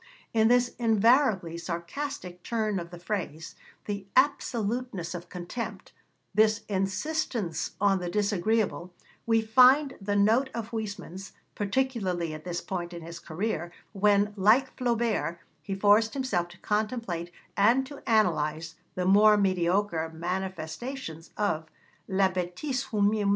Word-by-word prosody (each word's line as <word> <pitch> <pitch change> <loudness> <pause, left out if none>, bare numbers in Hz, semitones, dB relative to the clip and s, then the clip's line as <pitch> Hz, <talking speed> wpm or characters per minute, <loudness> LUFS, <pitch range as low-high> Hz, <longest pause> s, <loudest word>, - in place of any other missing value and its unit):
In 220 -1 +4
this 245 +1 +4
invariably 220 - +3
sarcastic 175 - -5
turn 215 -3 -1
of 170 -1 -7
the 175 - -9
phrase, 170 -4 -4 0.3
this 205 -1 -3
absoluteness 235 - 0
of 175 0 -7
contempt, 190 +3 -6 0.4
this 215 0 +3
insistence 195 - -2
on 195 -1 +3
the 175 -1 -3
disagreeable, 205 -1 0 0.4
we 225 -1 +3
find 255 +5 +5
the 205 +1 -1
note 225 +7 +3
of 230 -1 -5
Huysmans, 205 -4 -6 0.2
particularly 200 -7 -1
at 155 +1 -9
this 175 -1 -3
point 175 -2 -4
in 170 -1 -7
his 170 +1 -8
career, 175 0 -3 0.2
when, 205 0 +3
like 220 +7 +3
Flaubert, 230 - 0 0.2
he 195 - -4
forced 210 +4 +4
himself 220 -11 0
to 175 +1 -15
contemplate 210 -5 -2 0.2
and 235 +7 +4
to 280 +1 -10
analyse 160 -8 +1 0.2
the 180 - -1
more 210 +3 +6
mediocre 185 -3 +1
manifestations 175 - -5
of 160 -7 0 0.4
la 195 0 +3
bêtise 190 +10 -3
humaine. 205 -1 +2
200 Hz, 125 wpm, -28 LUFS, 175-225 Hz, 0.4 s, more